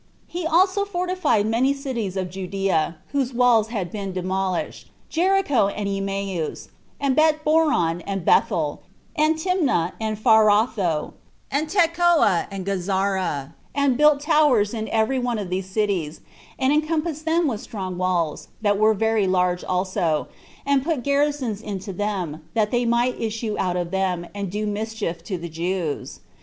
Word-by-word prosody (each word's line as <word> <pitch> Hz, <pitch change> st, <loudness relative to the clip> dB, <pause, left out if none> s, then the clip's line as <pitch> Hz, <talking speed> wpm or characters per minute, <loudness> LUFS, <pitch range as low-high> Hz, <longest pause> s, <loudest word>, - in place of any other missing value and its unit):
He 345 Hz, -1 st, -4 dB
also 375 Hz, +4 st, +3 dB
fortified 365 Hz, -, 0 dB
many 245 Hz, +5 st, +2 dB
cities 235 Hz, -9 st, -4 dB
of 185 Hz, -2 st, -3 dB
Judea, 185 Hz, -3 st, -1 dB
whose 270 Hz, -3 st, -1 dB
walls 240 Hz, -3 st, +4 dB
had 200 Hz, -7 st, -4 dB
been 200 Hz, -3 st, -4 dB
demolished; 185 Hz, 0 st, -2 dB, 0.2 s
Jericho, 350 Hz, -, +2 dB
and 200 Hz, 0 st, -3 dB
Emmaus, 195 Hz, -4 st, -3 dB, 0.3 s
and 275 Hz, -2 st, +1 dB
Betboron, 305 Hz, -, +2 dB
and 195 Hz, -3 st, -3 dB
Bethel, 150 Hz, -3 st, +2 dB, 0.3 s
and 310 Hz, 0 st, +3 dB
Tinma, 315 Hz, -, +1 dB
and 215 Hz, -1 st, -2 dB
Pharatho, 215 Hz, -6 st, +3 dB, 0.4 s
and 300 Hz, +3 st, 0 dB
Tecoa, 340 Hz, -, +3 dB
and 195 Hz, -2 st, -6 dB
Gazara, 190 Hz, -6 st, -1 dB, 0.2 s
and 280 Hz, -3 st, +2 dB
built 300 Hz, +1 st, +4 dB
towers 285 Hz, -9 st, +3 dB
in 220 Hz, -1 st, -3 dB
every 225 Hz, +4 st, +1 dB
one 245 Hz, -2 st, -1 dB
of 195 Hz, -4 st, -5 dB
these 185 Hz, +1 st, -2 dB
cities, 190 Hz, -7 st, -1 dB, 0.4 s
and 265 Hz, +2 st, +2 dB
encompassed 310 Hz, 0 st, -1 dB
them 330 Hz, +1 st, +2 dB
with 225 Hz, -6 st, -2 dB
strong 190 Hz, -4 st, -5 dB
walls, 175 Hz, -4 st, -1 dB, 0.2 s
that 205 Hz, -1 st, +2 dB
were 215 Hz, 0 st, +4 dB
very 220 Hz, -1 st, +1 dB
large 180 Hz, -1 st, +1 dB
also, 180 Hz, -4 st, -1 dB, 0.4 s
and 280 Hz, -1 st, +2 dB
put 305 Hz, -5 st, -1 dB
garrisons 280 Hz, -6 st, 0 dB
into 195 Hz, -2 st, -5 dB
them, 180 Hz, -6 st, -3 dB
that 215 Hz, -2 st, +1 dB
they 245 Hz, 0 st, +1 dB
might 240 Hz, +2 st, +1 dB
issue 220 Hz, -1 st, -2 dB
out 180 Hz, -1 st, 0 dB
of 175 Hz, -1 st, -3 dB
them, 185 Hz, -2 st, -1 dB
and 200 Hz, -2 st, -4 dB
do 210 Hz, +3 st, -3 dB
mischief 210 Hz, -5 st, -3 dB
to 190 Hz, -, -3 dB
the 170 Hz, 0 st, -6 dB
Jews. 170 Hz, -1 st, -3 dB
210 Hz, 150 wpm, -23 LUFS, 185-280 Hz, 0.4 s, walls